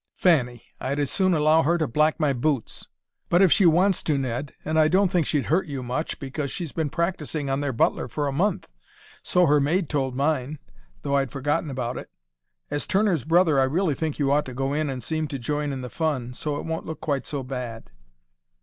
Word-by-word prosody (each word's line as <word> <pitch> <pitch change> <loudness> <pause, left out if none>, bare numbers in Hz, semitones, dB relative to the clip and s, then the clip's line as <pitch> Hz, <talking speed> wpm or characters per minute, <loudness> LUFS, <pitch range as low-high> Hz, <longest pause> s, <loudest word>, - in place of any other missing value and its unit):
"Fanny! 125 -9 +2 0.2
I'd 135 +2 -2
as 145 -2 -1
soon 185 -2 +2
allow 155 +1 +4
her 170 +4 +2
to 160 - 0
black 150 +6 +2
my 150 -3 +2
boots!" 135 -1 -2 0.4
"But 175 +3 +5
if 185 - +5
she 195 -5 +5
wants 180 +3 +3
to, 150 -3 0
Ned! 130 +1 -3
And 160 +1 +1
I 155 - +5
don't 185 +2 +3
think 175 -5 +1
she'd 145 -3 0
hurt 170 +4 +1
you 140 -3 -5
much, 130 +6 -3
because 140 +1 -4
she's 165 +1 -4
been 160 -3 -2
practising 160 -4 -2
on 135 +1 0
their 145 -1 -1
butler 120 - +1
for 145 +5 -2
a - - -1
month 180 +7 0 0.5
so 180 0 +3
her 150 -1 +4
maid 165 +4 +1
told 135 -4 -1
mine, 145 0 0 0.5
though 140 - -2
I'd 135 -2 0
forgotten 145 +3 -1
all - - -5
about 125 -1 -3
it. - - -11 0.6
As 145 - -2
Turner's 190 - +1
brother 165 -3 +4
I - - +5
really 160 +4 +1
think 155 +1 -3
you 140 -2 +1
ought 145 +1 +2
to 130 - -8
go 135 +2 -1
in 150 0 0
and 130 -3 -4
seem 155 +2 -2
to 140 - -4
join 145 +3 -2
in 135 -1 -4
the 125 - -5
fun, 140 -7 -2
so 150 +3 -3
it - - -5
won't 160 0 -4
look 160 - -5
quite 140 -3 -2
so 140 -3 -3
bad." 125 - -6
150 Hz, 225 wpm, -25 LUFS, 135-160 Hz, 0.6 s, But